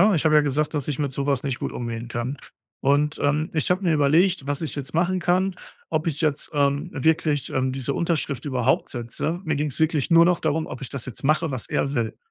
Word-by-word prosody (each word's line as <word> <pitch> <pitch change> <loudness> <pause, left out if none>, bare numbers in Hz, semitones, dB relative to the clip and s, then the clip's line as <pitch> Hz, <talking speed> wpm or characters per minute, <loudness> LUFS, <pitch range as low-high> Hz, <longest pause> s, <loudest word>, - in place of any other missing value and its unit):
ne, 210 +3 +6
ich 155 - -1
habe 155 -1 +4
ja 150 - +7
gesagt, 150 +2 0
dass 145 -2 -2
ich 145 -2 -2
mit 140 -2 -1
so 140 +1 -2
was 140 -3 +1
nicht 135 -3 -2
gut - - -4
umgehen 115 -1 -5
kann. 120 +3 -3 0.4
Und, 145 +2 +2
ähm, 150 +2 +1
ich 155 - +1
habe 185 +2 +2
mir 170 -4 +2
überlegt, 155 +2 +3
was 145 +1 -1
ich 160 - -3
jetzt 140 +1 -5
machen 180 +3 +1
kann, 185 +2 +1 0.3
ob 155 +1 -1
ich 155 -1 -1
jetzt, 150 -2 0
ähm, 140 +3 +1
wirklich, 150 0 +1
ähm, 130 0 0
diese 135 +1 -2
Unterschrift 160 -5 -1
überhaupt 130 -2 +1
setze. 125 +8 -3
Mir 160 -3 0
ging's 150 0 -2
wirklich 160 0 +1
nur 165 0 +7
noch 180 -1 +2
darum, 160 +1 0
ob 130 - -8
ich 130 - -5
das 135 -3 -4
jetzt 130 +1 -7
mache 155 +2 +2
was 130 -4 -4
er 140 - -1
will. 115 -4 -1
145 Hz, 240 wpm, -24 LUFS, 135-160 Hz, 0.4 s, ja